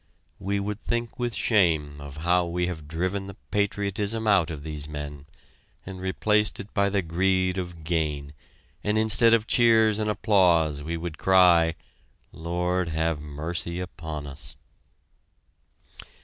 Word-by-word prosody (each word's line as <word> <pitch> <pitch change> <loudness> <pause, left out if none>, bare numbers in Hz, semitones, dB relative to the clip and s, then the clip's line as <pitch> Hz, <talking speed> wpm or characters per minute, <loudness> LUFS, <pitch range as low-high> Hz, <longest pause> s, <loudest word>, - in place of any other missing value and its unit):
We 100 +1 -1
would 105 +1 -4
think 120 +1 -3
with 120 -1 -1
shame 80 -9 +1
of 70 0 -9
how 90 0 +3
we 90 +1 -1
have 80 -4 -6
driven 95 +5 -2
the 100 - -9 0.2
patriotism 100 +2 -1
out 95 -7 +3
of 75 -3 -6
these 75 -1 -4
men 75 -1 -7 0.6
and 95 -1 -8
replaced 105 +3 +1
it 100 +1 -9
by 100 0 +2
the 100 -1 0
greed 95 +2 +1
of 85 -3 -7
gain, 75 -3 -2 0.5
and 105 +1 +1
instead 110 +1 +5
of 110 -2 -1
cheers 110 -3 +4
and 105 0 0
applause 85 -9 +3
we 80 +3 -4
would 80 -2 -6
cry: 85 -3 +5 0.6
"Lord, 90 +1 -2
have 80 -1 -1
mercy 80 +4 -3
upon 80 -4 -6
us!" 70 +1 -7
90 Hz, 140 wpm, -26 LUFS, 80-100 Hz, 0.6 s, instead